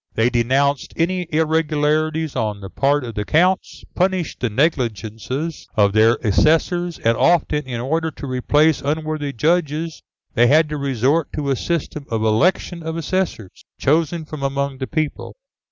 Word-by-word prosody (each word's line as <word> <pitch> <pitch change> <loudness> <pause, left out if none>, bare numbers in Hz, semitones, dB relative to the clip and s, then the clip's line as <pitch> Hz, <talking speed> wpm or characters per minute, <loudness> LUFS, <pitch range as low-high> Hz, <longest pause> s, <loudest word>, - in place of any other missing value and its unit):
They 115 +2 +2
denounced 135 +4 +1
any 180 +1 0
irregularities 155 0 0
on 105 -2 -2
the 95 -2 -9
part 140 +1 +1
of 115 -2 -6
the 105 - -2
Counts, 180 - +1
punished 185 -2 -1
the 125 - -1
negligences 125 - -2
of 100 -2 +3
their 110 +2 +5
assessors, 165 - +2
and 115 0 +1
often, 150 0 +2
in 120 -2 -4
order 160 +6 -1
to 145 - -9
replace 145 +4 +2
unworthy 155 0 -2
judges, 160 +4 -1 0.3
they 120 +1 +4
had 155 +3 +4
to 150 - -3
resort 140 +3 0
to 145 -2 -2
a - - +2
system 150 -1 -3
of 110 -1 -1
election 170 - +1
of 160 0 -4
assessors, 165 - -3 0.2
chosen 160 +2 +1
from 155 -1 -8
among 140 0 -2
the 130 - -3
people. 155 +6 -3
150 Hz, 155 wpm, -20 LUFS, 125-160 Hz, 0.3 s, their